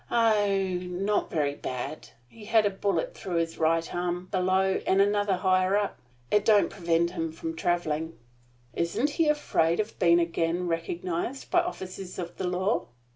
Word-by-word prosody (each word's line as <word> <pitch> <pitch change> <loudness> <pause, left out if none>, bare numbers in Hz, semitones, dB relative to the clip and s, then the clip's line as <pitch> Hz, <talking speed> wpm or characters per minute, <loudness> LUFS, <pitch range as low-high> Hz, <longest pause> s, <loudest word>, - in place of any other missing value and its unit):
"Oh, 215 -4 +3 0.3
not 185 +3 -1
very 145 -3 0
bad. 130 +2 -6 0.2
He 210 - -14
had 220 0 +4
a 205 - +2
bullet 205 - -1
through 185 - -5
his 165 -1 -1
right 165 +1 +1
arm, 175 +1 -2
below, 190 0 +2
and 190 - +3
another 205 0 +3
higher 185 +1 +2
up. 205 -1 -2 0.3
It 210 -1 +4
don't 210 -2 +4
prevent 170 -1 +1
him 165 -3 -3
from 165 0 -5
traveling." 160 -1 -1 0.6
"Isn't 225 - 0
he 325 +1 +1
afraid 175 - +2
of 215 +1 -3
being 170 0 +5
again 170 +1 0
recognized 170 +8 -3
by 355 - +5
officers 190 - -6
of 175 -1 -6
the 185 - -2
law?" 185 +5 0
185 Hz, 160 wpm, -27 LUFS, 170-205 Hz, 0.6 s, being